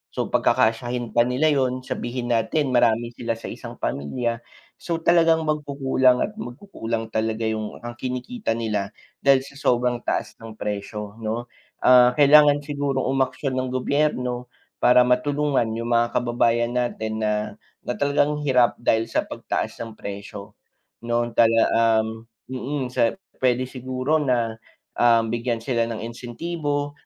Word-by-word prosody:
So - - -2
pagkakasyahin 120 +1 +1
pa 120 +2 +3
nila 145 +5 +2
‘yon, 130 -2 0
sabihin 120 -1 -4
natin 125 +5 +1
marami 120 -1 +2
sila 115 -1 -3
sa 115 - -8
isang - - -9
pamilya, 115 - -2 0.4
so 170 - -2
talagang 165 -1 +4
magkukulang 140 -4 +1
at 210 - -5
magkukulang 120 - -5
talaga 110 0 -1
yung 110 -1 -4
ang 120 0 -6
kinikita 125 - -3
nila 105 -4 -2 0.3
dahil 135 -1 +6
sa 140 - -13
sobrang 125 -1 +1
taas - - -2
ng 115 -1 -10
presyo 105 0 -5
'no, 115 +2 -3 0.4
ah, 125 -1 +6
kailangan 145 0 +6
sigurong 140 -2 -2
umaksyon 130 0 -1
ng 130 - -2
gobyerno 125 -2 -1 0.3
para 125 0 +6
matulungan 135 0 +1
yung 115 +1 -3
mga 120 0 +3
kababayan 120 -1 +1
natin 110 -3 -2
na 105 -1 +1 0.5
na 125 - -2
talagang 145 +1 +1
hirap 125 -4 +3
dahil 115 -1 +1
sa - - +1
pagtaas - - -3
ng 115 -1 -11
presyo. 100 0 -8 0.5
Noon 120 0 0
tala 115 -1 +5 0.4
um, 110 - -4 0.4
mm, 130 +1 -3
sa 115 -2 +2 0.3
pwede 125 0 +3
siguro 130 +3 -2
na, 120 -6 0 0.4
um, 115 -1 +4
bigyan 120 0 -1
sila 115 -3 0
ng 115 -2 -5
insentibo 145 +5 -3
125 Hz, 140 wpm, -23 LUFS, 115-140 Hz, 0.5 s, dahil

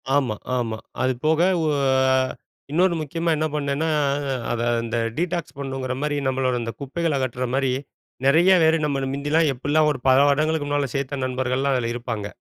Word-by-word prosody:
ஆமா 130 -7 +1 0.2
ஆமா. 115 -2 -2 0.2
அது 130 0 +2
போக 160 +1 +3 0.2
ஓ - - 0 0.5
ஆ - - +4 0.6
இன்னொரு 175 +2 +3
முக்கியமா 165 +3 -2
என்ன 155 - 0
பண்ணேன்னா, 145 +1 -1 0.6
அதை 120 0 -1 0.2
அந்த 115 0 -3 0.2
டீடாக்ஸ் 175 -2 -2
பண்ணணுங்கிற 135 -2 -3
மாரி 150 -1 -1
நம்மளோட 130 -1 0
அந்த 115 0 -3
குப்பைகள 150 +2 -1
அகற்ற 130 -1 -2
மாரி 135 -1 +1 0.5
நெறைய 165 +7 +5
பேரு 160 0 +4
நம்மள 140 -2 -1
மிந்தில்லாம் 145 +2 +1
எப்டிலாம் 150 +4 +2
ஒரு 130 - -4
பல 130 0 +6
வருடங்களுக்கு 155 +1 +1
முன்னாடி 145 -2 0
சேர்த்த 140 0 -2
நண்பர்கள்லாம் 130 +1 0
அதில 120 -2 -1
இருப்பாங்க. 115 -4 -4
140 Hz, 160 wpm, -23 LUFS, 130-155 Hz, 0.6 s, பல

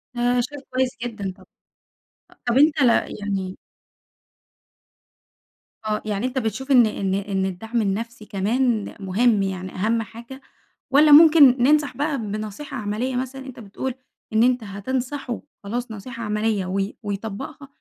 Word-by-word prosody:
ده 240 - -2 0.3
شئ 290 - -10
كويّس 255 0 0
جدًا 215 -5 -4
طبعًا. - - -17 0.9
أ - - -19
طَب 240 0 +1
أنت 300 +1 +4
ل 250 - +6 0.3
يعني 195 -2 -3 2.3
آه، 215 0 0
يعني 210 +1 -2
أنت 255 +1 -6
بتشوف 255 +4 -3
إن 245 -3 +7
إن 195 -3 -1
إن 195 -1 -1
الدعم 225 +5 -2
النَفسي 215 +2 -3
كمان 220 +3 0
مهم، 205 +2 +2
يعني 185 -1 -4
أهم 225 +4 +1
حاجة، 235 +4 -10 0.5
والّا 295 +2 +6
ممكن 290 -5 +8
ننصح 290 -2 +3
بقى 290 0 0
بنصيحة 215 +5 -5
عملية 220 +4 -2
مثلًا، 260 +1 -4
أنت 260 -2 -10
بتقول 235 +4 -5 0.4
إن 220 +1 +4
أنت 250 -1 +2
هتنصحه 245 +5 -4 0.2
خلاص 235 +4 -4
نصيحة 230 +3 -7
عملية 210 -2 0
وي 195 +2 -2
ويطبّقها، 220 +8 -5
230 Hz, 140 wpm, -23 LUFS, 205-260 Hz, 2.3 s, ممكن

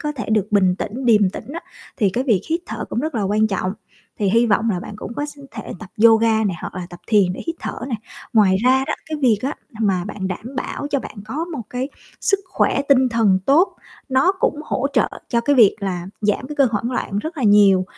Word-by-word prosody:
có 300 - -2
thể 235 -8 -6
được 215 -3 +2
bình 190 -3 +4
tĩnh, 255 +5 -4
điềm 210 -5 +4
tĩnh 230 +6 -8
á 335 - -5 0.4
thì 205 -6 +2
cái 250 +7 -1
việc 220 -9 +3
hít 330 +2 +1
thở - - -5
cũng - - -3
rất 310 0 -3
là 220 - 0
quan 210 +2 +2
trọng. 190 -2 -2 0.5
Thì 205 -2 +1
hy 230 +3 +4
vọng 225 +1 +2
là 180 -4 -1
bạn 205 - -8
cũng 220 - -7
có 290 - -2
s 290 0 -11
thể 220 - -7
tập 215 - -10 0.2
yoga 225 -1 +5
nè, 195 -4 0
hoặc - - -6
là 180 -1 -5
tập 175 - -11
thiền 200 -5 +3
để - - -7
hít 330 0 -3
thở - - -5
nè. 250 - -1 0.4
Ngoài 200 -4 +5
ra 260 +1 +4
đó 305 - -1
cái 315 - -3
việc 230 -5 +4
á 275 +3 -1 0.3
n 220 - +2
mà 185 -3 +1
bạn 195 -1 -4
đảm 230 +8 -6
bảo 285 - -3
cho 285 - +2
bạn - - -9
có 290 +9 -3
một 315 -8 -6
cái 250 +2 -3 0.3
sức 395 -3 +2
khỏe 280 - +1
tinh 260 -2 +5
thần 225 -5 +3
tốt, 325 +8 +4 0.3
nó 265 +8 +3
cũng 300 -5 -1
hỗ 270 -2 -1
trợ - - +3 0.2
cho 235 - +1
cái 285 +4 +2
việc 220 -6 +6
là 180 -3 -3
giảm 210 +5 0
cái 300 - -6
cơn 275 -3 +4
hoảng 225 +3 -1
loạn 205 -5 -2
rất 315 +10 -5
là 275 - -3
nhiều. 205 -3 +5
230 Hz, 250 wpm, -20 LUFS, 200-270 Hz, 0.5 s, việc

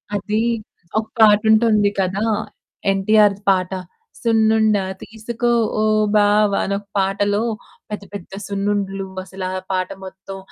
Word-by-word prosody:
అది, 210 +2 -1 0.6
ఒక 220 - -4
పాటుంటుంది 215 0 +5
కదా! 195 +2 0 0.7
ఎన్‌టిఆర్‌ది 205 +1 +3
పాట 185 -1 +2 0.5
'సున్నుండ 220 -1 +3 0.3
తీసుకో 230 +2 -3 0.3
ఓ - - +2 0.3
బావ' 205 0 +4
అనొక 200 +1 -3
పాటలో 200 +2 +1 0.5
పెద్ద 210 -1 -5
పెద్ద 195 -2 -8
సున్నుండలు, 200 -1 -2 0.2
అసలు 190 0 -7
ఆ 185 - -3
పాట 185 -1 -1 0.2
మొత్తం. 190 +1 -9
205 Hz, 110 wpm, -20 LUFS, 195-215 Hz, 0.7 s, పాటుంటుంది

